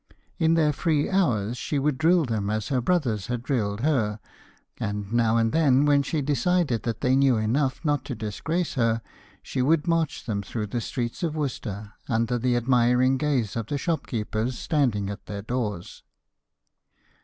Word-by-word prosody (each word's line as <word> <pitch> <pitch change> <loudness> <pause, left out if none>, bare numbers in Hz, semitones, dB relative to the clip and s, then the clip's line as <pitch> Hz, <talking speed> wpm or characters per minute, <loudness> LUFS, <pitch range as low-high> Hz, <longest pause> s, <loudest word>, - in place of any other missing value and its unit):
In 165 0 +3
their 155 -2 +3
free 150 0 0
hours, 120 - +1
she 150 - -2
would 140 -1 0
drill 165 0 +4
them 110 -4 -2
as 110 0 -2
her 130 -3 +1
brothers 120 - 0
had 120 -1 -3
drilled 110 -6 -1
her, 115 -8 +1 0.6
and 105 0 -3
now 115 -1 +3
and 115 -1 +2
then 145 -4 +4
when 145 -1 +4
she 145 +1 -2
decided 150 - +1
that 115 -2 -3
they 130 +1 +3
knew 135 -3 +4
enough 130 +7 0
not 145 -3 +1
to 130 - -4
disgrace 160 - -2
her, 115 -3 +1 0.4
she 130 - -2
would 150 +5 +2
march 165 -3 0
them 105 -3 -2
through 105 +2 -4
the 120 +3 -3
streets 120 +1 -4
of 165 -3 -1
Worcester, 110 -8 -4 0.2
under 115 +1 +1
the 125 +1 +1
admiring 125 +1 +3
gaze 130 -9 0
of 115 -2 -3
the 145 - -2
shopkeepers 120 - -2
standing 125 - 0
at 100 - -9
their 100 -1 -5
doors. 110 -6 -4
125 Hz, 170 wpm, -25 LUFS, 110-145 Hz, 0.6 s, drill